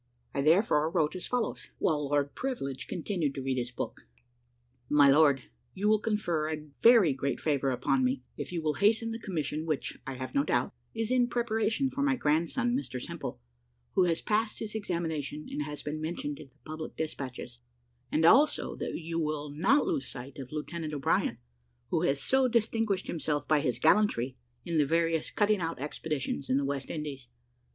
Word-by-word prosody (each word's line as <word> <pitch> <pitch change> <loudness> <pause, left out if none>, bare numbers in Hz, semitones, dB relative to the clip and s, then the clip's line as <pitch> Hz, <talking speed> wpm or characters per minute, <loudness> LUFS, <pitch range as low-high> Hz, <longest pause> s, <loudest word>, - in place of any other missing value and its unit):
I 140 - 0
therefore 155 0 +4
wrote 165 -1 +1
as 185 - -4
follows, 245 -2 -2
while 150 -3 +1
Lord 145 -1 +1
Privilege 140 - -3
continued 170 -5 -2
to 135 - -4
read 130 -1 0
his 120 0 -2
book: 125 - -6 0.8
"MY 145 -1 +6
LORD, 140 -3 +5 0.3
You 200 +2 0
will 215 0 +5
confer 175 -8 0
a 155 -1 -5
very 230 - +7
great 135 +1 -2
favour 140 -3 +1
upon 130 +1 +1
me, 125 0 0
if - - -6
you 170 -2 -3
will 155 -1 +1
hasten 225 +2 +3
the 225 - -4
commission 155 - -2
which, 155 -3 -2
I 135 - -4
have 130 0 -6
no 140 - +3
doubt, 125 -4 0 0.2
is 225 +1 -1
in 250 -1 +4
preparation 235 +2 0
for 275 - -3
my 280 -2 +3
grandson 170 - +1
Mr 255 - -3
Simple, 90 - -6 0.5
who 185 - +4
has 170 -2 +1
passed 215 +1 0
his 215 -1 -5
examination, 160 -8 -3
and - - -2
has 150 0 -7
been 155 +1 -4
mentioned 155 -3 -3
in 145 - -10
the 130 - -31
public 155 0 -6
despatches; 130 -6 -5 0.5
and 160 +1 +3
also 290 - +5
that - - -3
you 165 0 -3
will 150 -2 -2
not 230 - +3
lose 330 -7 -1
sight 130 +2 -8
of 130 -1 -8
Lieutenant 155 0 -4
O'Brien, 140 - +1 0.5
who - - +2
has 140 0 +1
so 265 - +3
distinguished 225 -4 +1
himself 150 -3 -2
by 155 -1 +4
his 125 -5 0
gallantry 130 - +3 0.3
in 170 -2 0
the - - +6
various 165 0 +1
cutting 210 -1 +2
out 165 0 -2
expeditions 145 -1 -3
in 130 - +3
the 140 - +1
West 140 -1 -3
Indies. 145 -5 -5
155 Hz, 185 wpm, -30 LUFS, 140-210 Hz, 0.8 s, very